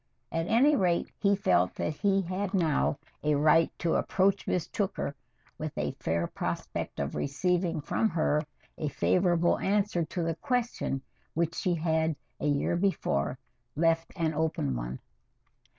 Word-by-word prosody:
At 165 +1 -1
any 275 +7 +5
rate, 180 -7 +1
he 200 0 +3
felt 90 - +2
that 155 - -1
he 195 +4 +2
had 185 +3 -2
now 160 -5 +2 0.3
a 150 0 +3
right 155 +3 +5
to 170 - 0
approach 195 +1 +2
Miss 180 -4 0
Tooker 195 -8 -2 0.5
with - - -5
a - - 0
fair 85 +1 0
prospect - - -4
of 70 0 -2
receiving 170 +3 0
from 220 +8 +1
her 155 -3 +1 0.4
a 155 - -1
favorable 175 +2 +2
answer 200 -3 +1
to 170 +2 -3
the 165 0 0
question 240 - -1 0.3
which 165 +1 +1
she 175 0 0
had 160 -1 +1 0.2
a - - -1
year 145 +4 +1
before 170 - 0 0.4
left 165 +1 +2
an 165 -3 0
open 155 - 0
one. - - -4
165 Hz, 150 wpm, -29 LUFS, 150-190 Hz, 0.5 s, any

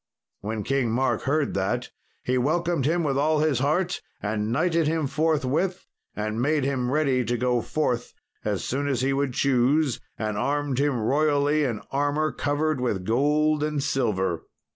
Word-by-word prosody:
When 105 +1 -4
King 135 -1 0
Mark 130 +3 +1
heard 150 0 +1
that 120 +6 -1 0.3
he 130 - 0
welcomed 160 +1 +1
him 170 +2 +1
with 140 -3 0
all 155 +2 +2
his 155 -5 +2
heart, 170 +7 0 0.2
and 105 +1 -2
knighted 165 +4 +2
him 160 -1 0
forthwith, 160 +4 0 0.3
and 110 +2 -2
made 145 +2 +2
him 130 -2 0
ready 135 -3 +2
to 120 +1 -1
go 125 0 +1
forth 125 -3 -2 0.3
as 105 -2 -1
soon 140 +3 -2
as 130 -4 0
he 135 +1 +1
would 140 -2 0
choose, 140 +1 +2 0.2
and 105 -1 -2
armed 140 +1 0
him 140 -3 +1
royally 145 +4 +2
in 115 -5 -2
armour 145 +2 +1
covered 145 -1 -1
with 100 -7 -1
gold 150 +6 +2
and 150 -2 -1
silver. 100 - 0
140 Hz, 165 wpm, -25 LUFS, 120-150 Hz, 0.3 s, all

